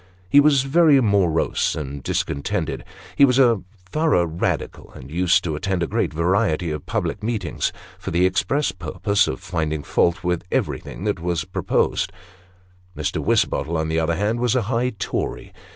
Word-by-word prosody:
He 140 - +6
was 145 -2 +5
very 150 0 +5
morose 100 -8 +1
and 70 -2 -5
discontented. 70 +1 -2 0.4
Ho 140 - +9
was 125 0 +2
a 120 -6 +4 0.3
thorough 155 - +2
Radical, 80 +1 -3
and 65 +2 -11
used 90 +2 +2
to 80 -3 -2
attend 90 +3 -1
a - - -1
great - - -1
variety 85 0 +1
of 75 -1 -6
public 105 - -2
meetings, 105 -5 -2 0.3
for - - -5
the 85 +2 +2
express 100 +9 +1
purpose 100 +1 0
of 65 - -3
finding 80 -3 -3
fault 85 0 +1
with 90 -1 -1
everything - - -2
that 105 -3 -1
was 85 -2 -2
proposed. - - 0 0.9
Mr. - - -2
Wisbottle, 85 +1 +1
on 80 0 -1
the 80 0 +1
other 80 +1 0
hand, 105 +6 0
was 120 0 +1
a 125 - +2
high 120 +3 0
Tory. 95 - -4
90 Hz, 165 wpm, -22 LUFS, 80-115 Hz, 0.9 s, Ho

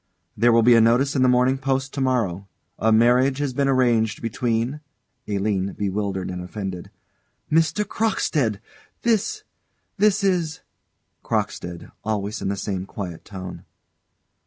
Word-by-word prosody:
There 120 +3 +4
will 115 0 +5
be 120 +1 +7
a 115 - +6
notice 125 +6 +3
in 130 - +2
the 130 - +5
Morning 125 +2 +3
Post 135 0 -1
to 140 - -3
morrow: 105 -8 0 0.3
"A 110 - +3
Marriage 125 +4 +4
Has 145 -2 -2
Been 140 +2 +1
Arranged 120 -5 +2
Between 115 +4 -1 0.2
" 125 - -49
ALINE. 100 -1 -1
[Bewildered 100 -2 -2
and 90 0 -5
offended.] 90 -1 -6 0.6
Mr. 165 +6 +2
Crockstead! 150 - 0 0.4
This 235 - +1 0.5
this 205 0 +3
is 175 -5 0 0.6
CROCKSTEAD. 85 -1 -3
[_Always 105 0 -2
in - - -2
the 100 0 -1
same 95 -2 -3
quiet 90 -5 -6
tone. 95 -3 -8
115 Hz, 140 wpm, -23 LUFS, 100-135 Hz, 0.6 s, be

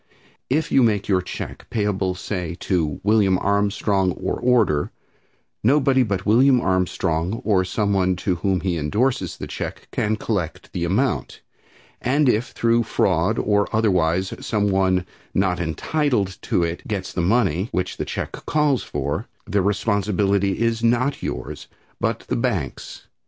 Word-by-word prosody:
If 150 +4 0
you 135 - +5
make 105 -4 +2
your 95 -2 +2
check 90 - -7
payable 100 -4 0
say, 90 -3 -4
to 80 -7 0
William 100 -3 +3
Armstrong 100 -1 +1
or - - -3
order, 115 -12 +2 0.7
nobody 135 +2 +4
but 100 -6 -1
William 125 +4 +5
Armstrong, 90 -1 0
or 100 -4 +3
some 100 +2 0
one 95 -1 +2
to 90 0 -1
whom 95 0 0
he 90 -2 -1
indorses 110 - 0
the - - -5
check, - - -6
can 110 +1 0
collect 100 -7 -3
the 85 -1 -1
amount, 110 +8 -1 0.6
and 140 +3 +2
if 120 -1 +2
through 115 0 +2
fraud 95 -2 +1
or 105 -1 +2
otherwise 95 -4 +1
some 105 -2 0
one 95 -1 +2 0.3
not 95 -2 +1
entitled 100 - -1
to 85 - +2
it 85 +1 -4
gets 100 -3 -3
the 90 - -1
money 95 0 +1
which 90 0 -2
the - - -3
check - - -4 0.2
calls 150 -4 +2
for, 70 0 -3 0.2
the 100 +1 +1
responsibility 100 -1 +1
is 115 0 0
not 120 +4 +2
yours, 60 0 -5 0.3
but - - -1
the - - -3
bank's. - - -3
100 Hz, 145 wpm, -22 LUFS, 90-115 Hz, 0.7 s, you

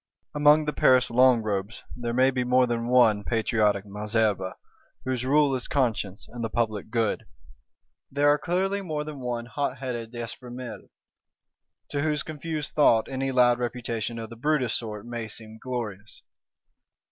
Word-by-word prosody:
Among 150 +1 +5
the 150 - -1
Paris 130 -1 +4
Long 125 -1 +5
robes 100 +1 -3
there 120 -1 -3
may 130 +2 +4
be 125 -1 -1
more 125 +1 +4
than 120 -1 -2
one 115 -5 +4
patriotic 105 -3 +1
Malesherbes, 105 -2 -1 0.5
whose 130 -2 -1
rule 145 +1 +4
is 130 -2 -1
conscience 110 -7 -1
and 120 -1 -7
the 115 - -1
public 110 -3 -1
good; 115 -2 -1 0.8
there 145 +2 +2
are 145 0 +4
clearly 190 +5 0
more 155 -5 -3
than 150 -2 -7
one 120 -2 -3
hotheaded 125 -3 -3
D'Espréménil, 120 0 -7 1.0
to 145 - -2
whose 150 -1 0
confused 155 -1 -5
thought 115 -7 +4
any 135 0 -2
loud 125 -1 +4
reputation 120 -1 -3
of 115 0 -7
the - - -8
Brutus 130 -1 0
sort 105 -2 -4
may 120 -2 -5
seem 110 0 -10
glorious. 110 -5 -6
120 Hz, 150 wpm, -26 LUFS, 110-135 Hz, 1.0 s, Among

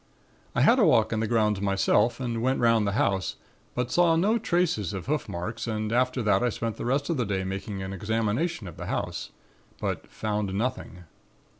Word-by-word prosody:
"I - - +2
had - - +5
a - - +5
walk - - +4
in 110 - 0
the 110 - 0
grounds 105 -3 +1
myself 100 +4 +2
and 120 -3 -2
went 130 +2 +1
'round 115 -3 +3
the 100 - 0
house, 95 -2 0 0.4
but 125 0 -1
saw 175 -2 +4
no 210 +8 +2
traces 170 - 0
of 95 -3 -5
hoof 150 -1 -1
marks 90 +8 -4
and 110 -1 -2
after 130 0 +1
that 105 -1 +3
I 125 - +2
spent 115 0 -3
the - - -5
rest 140 +6 0
of 165 - 0
the 125 - +1
day 95 -3 -1
making 95 +1 -4
an 95 +1 -5
examination 110 - -1
of 85 - -10
the - - -6
house, - - -3 0.5
but - - -3
found 105 -3 -2
nothing. 110 -6 -3
110 Hz, 200 wpm, -27 LUFS, 100-125 Hz, 0.5 s, had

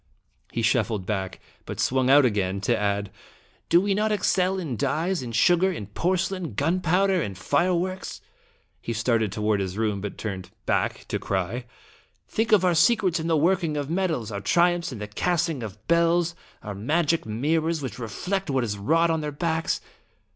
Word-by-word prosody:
He 115 - -2
shuffled 110 -3 +1
back, 95 -3 -3 0.3
but - - -6
swung 130 0 +2
out 140 0 +7
again 100 -4 0
to 100 - +2
add: 100 0 -1 0.3
" - - -35
Do 170 - +6
we 200 +2 +1
not 215 +2 +1
excel 190 -2 +1
in 160 -9 -3
dyes, 165 - 0
in 120 -2 -6
sugar, 175 +11 +4
in 155 - -5
porce 180 - 0
lain, 180 - -5
gunpowder, 180 - +2
and 100 -7 -4
fireworks?" 180 - 0 0.6
He 115 - -3
started 110 -1 +1
toward 105 0 0
his 95 0 -3
room, 105 -3 0
but 105 - -5
turned 95 -4 -5 0.2
back - - 0
to - - -1
cry: 100 +6 -2 0.6
"Think 225 +1 -1
of 200 -4 +5
our 180 - +4
secrets 185 -1 +3
in 160 - -3
the 165 -1 +3
working 165 -1 +1
of 145 +1 -3
metals, 165 - -1
our 100 -1 -4
triumphs 175 - +2
in 125 - -6
the 105 - -5
casting 165 +5 0
of 105 -3 -6
bells, 170 0 +3 0.3
our 105 - -5
magic 155 - 0
mirrors 155 +7 0
which 130 - -5
reflect 180 - -3
what 135 -2 +1
is 105 -3 -3
wrought 165 +10 +3
on 160 -1 0
their 150 -1 -3
backs!" 160 +2 -1
150 Hz, 180 wpm, -25 LUFS, 110-175 Hz, 0.6 s, out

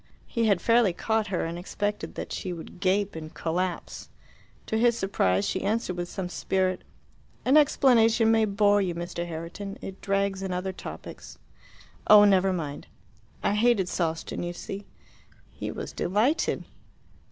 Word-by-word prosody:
He 230 -1 -1
had 200 -5 +3
fairly 230 -5 +4
caught 220 +3 0
her, 185 -3 -1
and 170 +1 -4
expected 205 +3 -3
that - - -6
she 185 - -4
would 170 +1 -10
gape 195 +1 +1
and 155 -1 -7
collapse. 175 +1 -3 0.6
To 220 - -1
his 235 0 +3
surprise 100 - +1
she - - -1
answered 210 -2 -1
with 175 0 -4
some 190 -2 -4
spirit, 185 0 -1 0.6
"An 265 - +4
explanation 235 -6 +5
may 225 -1 +4
bore 205 0 +3
you, 180 -3 -1
Mr. 170 0 -4
Herriton: 170 +5 -6
it 190 0 -8
drags 195 -1 0
in 190 -1 -3
other 185 +1 -2
topics." - - -9 0.7
"Oh, 210 -1 +9
never 195 -1 +4
mind." 150 -6 -4 0.6
"I - - +2
hated 210 -3 +3
Sawston, 165 -3 -2
you 175 0 -3
see." 195 +3 -7 0.6
He - - -6
was - - -6
delighted. 225 - +1
195 Hz, 150 wpm, -27 LUFS, 175-215 Hz, 0.7 s, Oh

